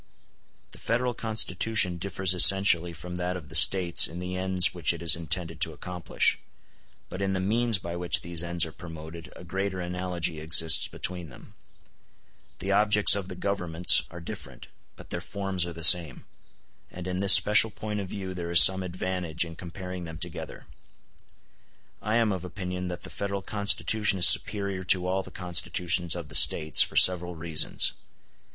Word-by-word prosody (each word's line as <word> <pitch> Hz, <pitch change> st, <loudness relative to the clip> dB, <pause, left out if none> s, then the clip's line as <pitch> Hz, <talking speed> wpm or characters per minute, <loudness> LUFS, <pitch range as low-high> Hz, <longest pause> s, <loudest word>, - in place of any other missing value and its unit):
The -, -, -15 dB
Federal 120 Hz, +1 st, -3 dB
Constitution 110 Hz, -4 st, +1 dB
differs 95 Hz, 0 st, +1 dB
essentially 90 Hz, -2 st, +4 dB
from 90 Hz, +2 st, -10 dB
that 90 Hz, +1 st, -4 dB
of 75 Hz, -5 st, -13 dB
the -, -, -13 dB
States 85 Hz, +1 st, +5 dB
in 85 Hz, -, -11 dB
the 90 Hz, +1 st, -7 dB
ends 95 Hz, -1 st, +1 dB
which 85 Hz, -2 st, -1 dB
it 85 Hz, -, -12 dB
is 85 Hz, +1 st, +3 dB
intended 80 Hz, 0 st, -4 dB
to 80 Hz, -2 st, +1 dB
accomplish, 90 Hz, +2 st, -2 dB, 0.7 s
but 95 Hz, -, -9 dB
in 95 Hz, 0 st, -2 dB
the 95 Hz, -, -3 dB
means 115 Hz, +3 st, -1 dB
by 85 Hz, -1 st, -8 dB
which 85 Hz, 0 st, -1 dB
these 85 Hz, -1 st, -4 dB
ends 85 Hz, -1 st, -3 dB
are 80 Hz, -, -10 dB
promoted 80 Hz, 0 st, -12 dB
a -, -, -13 dB
greater 95 Hz, +1 st, -5 dB
analogy 90 Hz, -2 st, -5 dB
exists 80 Hz, +1 st, +2 dB
between 90 Hz, -3 st, -4 dB
them. 100 Hz, -, -17 dB, 1.0 s
The 95 Hz, -, -5 dB
objects 105 Hz, 0 st, +3 dB
of 100 Hz, -2 st, -6 dB
the 95 Hz, -, -9 dB
Governments 90 Hz, -3 st, +2 dB
are 85 Hz, -, -11 dB
different, 85 Hz, -, -11 dB, 0.3 s
but -, -, -15 dB
their 85 Hz, -, -5 dB
forms 95 Hz, -1 st, -4 dB
are 85 Hz, -, -8 dB
the 85 Hz, 0 st, -7 dB
same; 85 Hz, -6 st, +5 dB, 0.6 s
and 90 Hz, -1 st, -11 dB
in 90 Hz, 0 st, -5 dB
this 100 Hz, +1 st, +5 dB
special 105 Hz, +2 st, +5 dB
point 105 Hz, 0 st, -7 dB
of 95 Hz, -2 st, -7 dB
view 95 Hz, -2 st, -7 dB
there 85 Hz, -2 st, -7 dB
is 85 Hz, 0 st, +8 dB
some 95 Hz, 0 st, +3 dB
advantage 90 Hz, -2 st, -5 dB
in 80 Hz, -1 st, -11 dB
comparing 90 Hz, +1 st, -9 dB
them 80 Hz, -1 st, -10 dB
together. 85 Hz, 0 st, -9 dB, 1.4 s
I 110 Hz, +1 st, -3 dB
am 115 Hz, -2 st, 0 dB
of 95 Hz, -2 st, -6 dB
opinion 90 Hz, 0 st, -7 dB
that 90 Hz, -1 st, -8 dB
the -, -, -10 dB
Federal 100 Hz, -1 st, -6 dB
Constitution 105 Hz, 0 st, 0 dB
is 90 Hz, -, +8 dB
superior 100 Hz, -3 st, +3 dB
to 90 Hz, -1 st, +1 dB
all 95 Hz, +1 st, -2 dB
the -, -, -13 dB
Constitutions 90 Hz, -1 st, 0 dB
of 85 Hz, -3 st, -8 dB
the -, -, -11 dB
States, 80 Hz, 0 st, +4 dB
for -, -, -2 dB
several 90 Hz, -1 st, +4 dB
reasons. 80 Hz, -1 st, -2 dB
90 Hz, 175 wpm, -25 LUFS, 85-95 Hz, 1.4 s, is